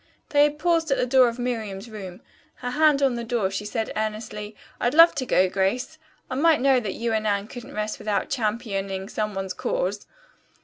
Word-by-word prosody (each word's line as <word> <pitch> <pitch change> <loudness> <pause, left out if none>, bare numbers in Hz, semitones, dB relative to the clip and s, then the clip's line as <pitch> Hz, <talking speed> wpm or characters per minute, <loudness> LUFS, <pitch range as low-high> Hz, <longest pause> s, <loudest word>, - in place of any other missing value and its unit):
They 290 0 +5
had 295 0 -1
paused 330 0 +1
at 275 - +2
the - - +1
door 255 0 +5
of 230 - -7
Miriam's 225 -5 -3
room. 195 -5 -9 0.3
Her 250 -1 -5
hand 295 0 +3
on 270 -2 +3
the 235 0 -4
door, 225 -5 -1
she 195 +2 -4
said 220 +1 -3
earnestly, 215 -1 -4 0.2
"I'd 245 +4 0
love 330 +1 +8
to 260 -3 -3
go, 185 -5 +4
Grace. 200 +11 -1 0.3
I - - -6
might 310 +4 +4
know 265 -1 +4
that 210 -5 -4
you 230 0 -2
and 215 0 0
Anne 200 0 0
couldn't 245 +1 -10
rest 215 0 -3
without 210 -1 -2
championing 200 -5 -2
some 210 -1 -3
one's 190 -1 -3
cause." 200 +3 -2
225 Hz, 205 wpm, -24 LUFS, 205-255 Hz, 0.3 s, love